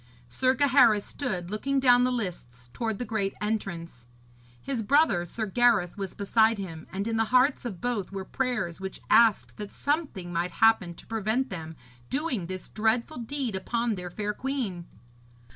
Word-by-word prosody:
Sir 260 0 +2
Gaheris 255 -6 +5
stood 190 -10 -4
looking 275 +6 0
down 245 -2 +5
the 255 - +1
lists 125 - -5
towards 225 -3 -2
the 245 - -4
great 205 -3 -2
entrance. 170 - -4 0.5
His 265 - -3
brother, 220 - +3
Sir 220 +5 -3
Gareth, 215 -4 +3
was 195 -3 -5
beside 220 +2 +3
him, 165 -5 -7
and 200 +3 -3
in 225 -1 -1
the 225 - +2
hearts 255 +3 +3
of 195 -8 -5
both 235 -7 -2
were 195 -1 -5
prayers 215 -9 -2
which 190 0 -6
asked 225 -3 +4
that 210 -1 -6
something 285 - -2
might 170 +1 -1
happen 220 -6 +3
to - - -13
prevent 225 +4 -1
them 160 -3 -6 0.3
doing 265 - -2
this 185 0 -6
dreadful 225 +3 0
deed 245 -2 -3
upon 230 +4 -1
their 180 -3 -5
fair 210 +3 -3
queen. 230 -10 -3
215 Hz, 165 wpm, -27 LUFS, 185-245 Hz, 0.5 s, Gaheris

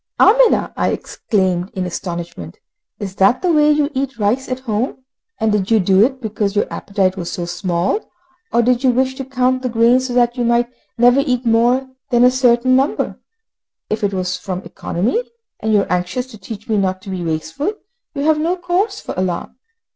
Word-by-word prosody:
"Amina," 480 +3 +4
I - - 0
exclaimed 185 -3 -1
in 185 -1 -2
astonishment, 170 - -6 0.4
"is 195 -2 -5
that 195 - +3
the 360 - +3
way 300 -1 +4
you 300 0 +2
eat 265 -2 -3
rice 235 +6 0
at 255 0 -3
home? 250 +2 -3 0.3
And 220 -1 +1
did 205 -2 0
you 225 -1 +4
do 190 +1 +4
it 260 +2 0
because 210 -3 -2
your 205 - +2
appetite 195 -2 -1
was 170 -2 -4
so 175 - -3
small, 175 - -1 0.4
or 235 0 +3
did 250 +1 +2
you 260 - +4
wish 260 +1 +1
to 270 - -6
count 255 0 0
the 255 - -2
grains 240 +3 +3
so 245 - -4
that 240 0 +2
you 245 - 0
might 235 +1 +1 0.2
never 245 +3 +5
eat 250 -3 -1
more 240 +3 +3 0.2
than 240 0 +4
a 250 - +6
certain 255 0 +3
number? 270 +2 0 0.7
If 215 - -1
it 200 - +2
was 185 -1 -2
from 185 -1 -5
economy, 210 - -2 0.4
and 220 - -1
you 210 -2 +4
are - - -5
anxious 180 +8 -1
to 220 - -11
teach 210 +2 -9
me 220 - +1
not 185 -1 -1
to 195 - -7
be 185 -2 -3
wasteful, 160 - -2 0.4
you 280 - -2
have 310 0 +3
no 345 +3 0
cause 370 +4 -1
for - - -6
alarm. 185 -1 -3
235 Hz, 200 wpm, -18 LUFS, 190-260 Hz, 0.7 s, a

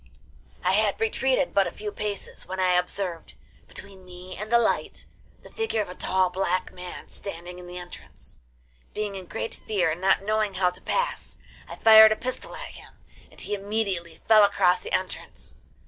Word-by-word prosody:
I 180 - +3
had 205 +1 +2
retreated 260 +4 +1
but 195 - +3
a - - -4
few 210 0 -6
paces 205 -1 -5
when 190 0 -5
I 185 -1 +3
observed, 180 -1 -2 0.3
between 195 -1 -12
me 180 0 -10
and 210 +3 -7
the 235 - +7
light, 235 - 0 0.4
the - - -14
figure 445 - -1
of 205 - -1
a - - -6
tall 185 0 +1
black 185 -1 -1
man 180 -1 -9
standing 180 -2 -7
in 180 - -10
the 180 0 -8
entrance. 175 - -11 0.6
Being 210 -1 -2
in 185 -2 -8
great 225 - -4
fear 195 -6 +2
and 165 +3 -5
not 195 0 +3
knowing 215 -1 0
how 185 -1 +2
to 180 - -11
pass, - - -2 0.3
I - - -8
fired 220 -1 +9
a - - +3
pistol 255 +3 -5
at - - -6
him, - - -13 0.4
and - - -17
he - - -4
immediately 195 -4 -2
fell 215 -1 +8
across 195 -3 +4
the - - -8
entrance. 185 - -4
195 Hz, 185 wpm, -26 LUFS, 180-215 Hz, 0.6 s, fired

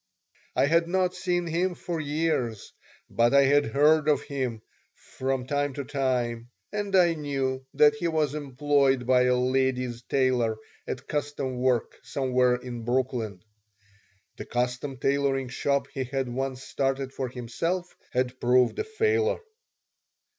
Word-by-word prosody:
I - - +4
had 165 +3 +3
not 185 0 +1
seen 180 -1 -1
him 175 +2 0
for 170 -1 -4
years, 145 - -1 0.3
but 120 +3 +2
I 140 - +7
had 145 +2 +4
heard 150 +5 +4
of 150 - +2
him 125 -6 -3 0.3
from 130 -1 -3
time 145 0 -1
to 140 - -3
time, 120 -3 -1 0.2
and 205 -2 -1
I 175 -2 +5
knew 135 -3 -2
that 150 0 +6
he 160 +4 -2
was 155 -4 0
employed 140 -2 +1
by 125 0 +4
a 125 0 +3
ladies' 125 -1 0
tailor 125 -4 +1 0.3
at 130 +2 -5
custom 145 -4 -3
work 125 -3 0
somewhere 125 -2 +1
in 125 -1 -7
Brooklyn. 120 -5 -1 0.9
(The - - -6
custom 125 +3 -2
tailoring 135 0 0
shop 140 +2 0
he 135 -3 -2
had 135 0 -2
once 130 +1 -3
started 135 0 -2
for 130 -2 -3
himself 165 +10 -3 0.2
had 125 0 -1
proved 125 0 +3
a - - +1
failure.) 440 +1 +1
135 Hz, 140 wpm, -27 LUFS, 125-150 Hz, 0.9 s, I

